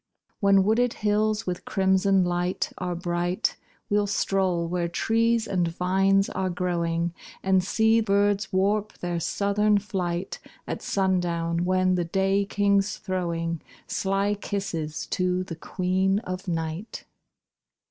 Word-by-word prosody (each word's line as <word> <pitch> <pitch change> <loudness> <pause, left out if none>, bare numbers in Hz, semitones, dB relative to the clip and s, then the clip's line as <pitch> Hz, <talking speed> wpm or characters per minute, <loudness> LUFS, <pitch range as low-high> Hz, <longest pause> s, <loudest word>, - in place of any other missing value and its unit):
When 200 -1 +5
wooded 230 +4 +2
hills 215 +1 0
with 180 -1 -3
crimson 190 -1 +2
light 175 +1 -1
Are 180 -1 -2
bright, 175 +1 -1 0.3
We'll 205 0 +1
stroll 190 -4 0
where 175 0 -1
trees 230 +5 +1
and 180 -5 0
vines 195 +3 +2
are 190 -1 -2
growing, 170 -1 -1 0.3
And 190 -1 +3
see 220 +4 +3
birds 205 0 +1
warp 205 +2 0
their 175 -1 -2
southern 205 +4 +2
flight 190 -3 -3 0.3
At - - -4
sundown, 175 -3 0
when 185 0 +2
the 175 -1 0
Day 195 +3 +1
King's 200 0 +1
throwing 170 -3 -2 0.2
Sly 195 +1 0
kisses 175 -7 -4
to 180 0 0
the 180 -3 -7
Queen 190 +3 0
of 185 -1 -6
Night. 165 +4 -4
190 Hz, 125 wpm, -26 LUFS, 175-200 Hz, 0.3 s, When